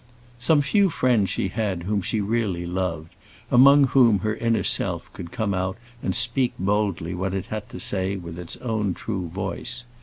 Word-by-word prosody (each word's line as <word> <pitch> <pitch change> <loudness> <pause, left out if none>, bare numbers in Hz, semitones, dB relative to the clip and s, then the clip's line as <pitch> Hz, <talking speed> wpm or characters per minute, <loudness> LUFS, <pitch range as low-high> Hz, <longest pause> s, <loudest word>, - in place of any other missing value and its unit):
Some 145 +2 +3
few 195 +8 +3
friends 120 - +1
she 95 - -1
had 100 -4 -2
whom 100 +2 -1
she 105 +3 -1
really 100 -5 -1
loved, 85 -3 -3 0.4
among 140 +3 +7
whom 125 -5 +4
her 110 +1 0
inner 115 0 0
self - - +1
could 85 - -8
come 105 -3 -1
out 95 +1 -2 0.2
and - - -1
speak 120 +2 +2
boldly 100 -4 -1
what 95 +1 -2
it 95 -1 -3
had 110 -1 -5
to - - -8
say 95 0 0
with 85 -2 -8
its 85 -1 -7
own 105 -6 -2
true 95 -5 -4
voice. 120 +7 -4
100 Hz, 180 wpm, -24 LUFS, 95-120 Hz, 0.4 s, among